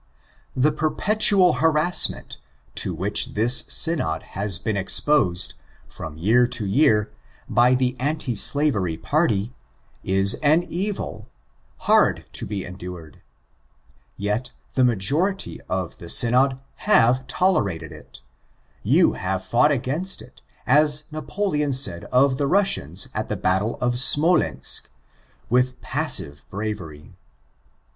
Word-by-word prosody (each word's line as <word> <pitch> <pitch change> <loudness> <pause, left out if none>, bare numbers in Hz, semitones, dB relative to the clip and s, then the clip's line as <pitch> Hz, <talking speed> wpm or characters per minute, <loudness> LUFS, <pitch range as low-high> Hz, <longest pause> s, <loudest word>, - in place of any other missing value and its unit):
The 140 +4 +2
perpetual 185 +4 +2
harrassment 160 +2 +1 0.3
to - - 0
which 95 +5 -1
this 115 +5 +4
Synod 80 - -1
has 100 -2 -1
been 110 +4 -3
exposed, 95 -2 0 0.3
from 80 -1 -9
year 115 +8 +3
to 120 -3 -2
year, 105 -1 +2 0.4
by 125 +1 +3
the 125 0 0
Anti 145 -1 -2
Slavery 105 - +1
party, 115 - 0 0.5
is 95 +1 +3
an 155 +3 +3
evil, 175 - -5 0.5
hard - - +2
to - - -4
be 100 -1 -4
endured; 90 -4 -10 1.0
yet 105 +5 -2 0.2
the 130 - +2
majority 140 - 0
of 90 -2 -3 0.2
Synod 130 +3 +3 0.2
have 130 - +2
toleraled 105 - 0
it 75 - -14 0.3
— 65 0 -38 0.2
you - - +4
have 95 +1 -3
fought 125 +8 +3
against 145 +8 -3
it, - - -19 0.2
as 150 +3 +2
Napoleon 155 -2 -2
said 125 -10 -1
of 130 +1 +2
the 140 - 0
Russians 140 - +1
at - - -3
the - - -3
battle 95 +5 0
of 120 0 0
Smolensk, 145 - +2 0.6
'*with 125 +1 +1
passive 70 -1 -1
bravery." 95 -8 -6
125 Hz, 115 wpm, -22 LUFS, 95-150 Hz, 1.0 s, this